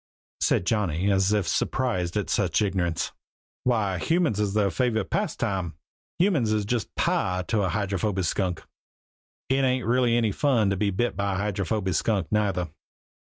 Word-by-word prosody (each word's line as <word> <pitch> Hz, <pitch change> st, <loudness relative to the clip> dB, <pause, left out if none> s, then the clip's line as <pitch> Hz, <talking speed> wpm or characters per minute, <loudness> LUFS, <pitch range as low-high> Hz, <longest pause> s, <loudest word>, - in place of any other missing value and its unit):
said -, -, +2 dB
Johnny, 100 Hz, -2 st, +1 dB
as 95 Hz, 0 st, +2 dB
if 105 Hz, -3 st, +1 dB
surprised 105 Hz, -9 st, 0 dB
at 100 Hz, -5 st, -1 dB
such 85 Hz, +1 st, +1 dB
ignorance. 90 Hz, -4 st, -1 dB, 0.5 s
"Why, 105 Hz, -7 st, +1 dB
humans 165 Hz, -, +1 dB
is 105 Hz, -1 st, 0 dB
their 100 Hz, -2 st, +2 dB
favorite 115 Hz, -5 st, 0 dB
pastime! 90 Hz, -5 st, -1 dB, 0.4 s
Humans 155 Hz, -, +2 dB
is 105 Hz, -1 st, 0 dB
just 115 Hz, 0 st, -2 dB
pie 90 Hz, 0 st, 0 dB
to 110 Hz, -3 st, +2 dB
a 95 Hz, -, +1 dB
Hydrophoby 100 Hz, 0 st, -1 dB
Skunk. 90 Hz, 0 st, -1 dB, 0.8 s
It 135 Hz, +1 st, +2 dB
ain't 130 Hz, -1 st, +1 dB
really 120 Hz, 0 st, +3 dB
any 115 Hz, -3 st, +2 dB
fun 115 Hz, -4 st, +2 dB
to -, -, +1 dB
be 100 Hz, +1 st, +1 dB
bit 110 Hz, +6 st, -1 dB
by 100 Hz, -1 st, -1 dB
a -, -, -1 dB
Hydrophoby 100 Hz, -1 st, -1 dB
Skunk 95 Hz, +1 st, 0 dB
neither." 100 Hz, -5 st, 0 dB
100 Hz, 160 wpm, -26 LUFS, 95-115 Hz, 0.8 s, really